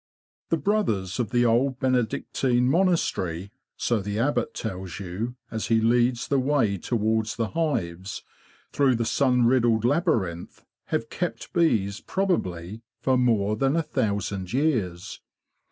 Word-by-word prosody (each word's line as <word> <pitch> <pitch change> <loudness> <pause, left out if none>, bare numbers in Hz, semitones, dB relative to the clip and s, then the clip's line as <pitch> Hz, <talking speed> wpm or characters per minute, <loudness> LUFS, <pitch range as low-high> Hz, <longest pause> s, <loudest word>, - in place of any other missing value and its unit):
The 165 - +2
brothers 125 - 0
of 120 - 0
the 120 0 +2
old 125 +3 +2
Benedictine 125 0 +1
monastery 130 - +1 0.3
—so 120 -2 +1
the 100 +1 -3
Abbot 120 0 0
tells 95 -5 -5
you, 100 +6 -4 0.2
as 110 -1 -3
he 115 -1 +3
leads 120 +2 +2
the 140 - +2
way 130 -8 +1
towards 110 +1 0
the 115 -2 -1
hives, 95 - -2 0.5
through 135 -3 +3
the 115 0 -1
sun 125 +1 +2
riddled 120 -3 +3
laby 150 +8 +2
rinth—have 85 -3 -6
kept - - -4
bees, 110 - +2
probably, 105 - -2 0.2
for 130 +2 +2
more 110 -5 +2
than 135 +6 +1
a 165 - +1
thousand 100 - -2
years. 115 - -1
115 Hz, 135 wpm, -25 LUFS, 100-130 Hz, 0.5 s, he